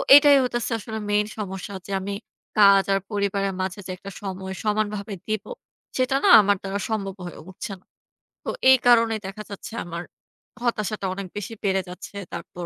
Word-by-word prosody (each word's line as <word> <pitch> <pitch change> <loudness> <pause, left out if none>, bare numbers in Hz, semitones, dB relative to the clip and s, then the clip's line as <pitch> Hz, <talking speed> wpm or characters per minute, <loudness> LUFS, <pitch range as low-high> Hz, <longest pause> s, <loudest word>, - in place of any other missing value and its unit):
এটাই 285 -1 +8
হইতেছে 240 -1 -1
আসলে 220 +1 -6
main 210 0 +3
সমস্যা 195 -1 -5
যে, 200 - -8
আমি 200 +1 -4 0.5
কাজ 200 -1 +8
আর 195 - +3
পরিবারের 200 -1 0
মাঝে 190 +2 -3
যে 185 - -5
একটা 200 +1 -9
সময় 190 -1 -5
সমানভাবে 210 -1 -1
দিবো, 215 - -3 0.5
সেটা 255 +1 +2
না - - +5
আমার 200 0 +2
দ্বারা 195 +1 -3
সম্ভব 195 -3 -2
হয়ে 175 - -8
উঠছে 190 +2 -7
না। - - -34 0.6
তো - - -4 0.2
এই 260 - +9
কারণেই 230 -2 +5
দেখা 215 +2 -7
যাচ্ছে 200 +2 -8
আমার 170 0 -5 0.6
হতাশাটা 215 -4 -1
অনেক 195 -1 -5
বেশি 205 +2 -5
বেড়ে 190 -1 +2
যাচ্ছে। 180 +2 -9 0.2
তারপর 175 -1 -6
200 Hz, 170 wpm, -24 LUFS, 195-215 Hz, 0.6 s, এই